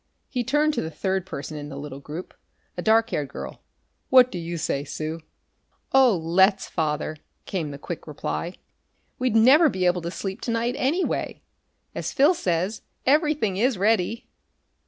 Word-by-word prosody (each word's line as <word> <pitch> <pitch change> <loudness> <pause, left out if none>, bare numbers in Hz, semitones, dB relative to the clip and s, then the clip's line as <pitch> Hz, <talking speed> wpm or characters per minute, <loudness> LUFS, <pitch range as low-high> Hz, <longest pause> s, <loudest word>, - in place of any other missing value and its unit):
He 250 -3 -1
turned 295 +5 +2
to - - -1
the 160 - -4
third 190 +3 -2
person 150 -1 -6
in 145 0 -7
the 140 - -8
little 140 -1 -7
group, 155 +6 -8 0.4
a - - -3
dark 225 +1 +3
haired 145 -2 -1
girl. - - -8 0.5
"What 255 -1 +7
do 180 - -4
you 170 0 -4
say, 140 -3 -1
Sue?" 155 +2 -4 0.7
"Oh, 260 -7 +6
let's, 190 +5 +3
Father!" 155 -1 -2 0.3
came 170 -6 -3
the 140 - -7
quick 165 +4 -7
reply. 165 +4 -4 0.6
"We'd 250 -3 +1
never 275 +8 +7
be 185 -6 -1
able 180 0 +2
to 170 - -4
sleep 190 +2 -5
to 235 - -2
night, 230 +1 0
anyway. 310 +9 -1 0.5
As - - -3
Phil 295 +6 +5
says, 185 - -1 0.2
everything 295 - +2
is 240 +1 +2
ready." 215 +2 +1
190 Hz, 165 wpm, -25 LUFS, 160-245 Hz, 0.7 s, What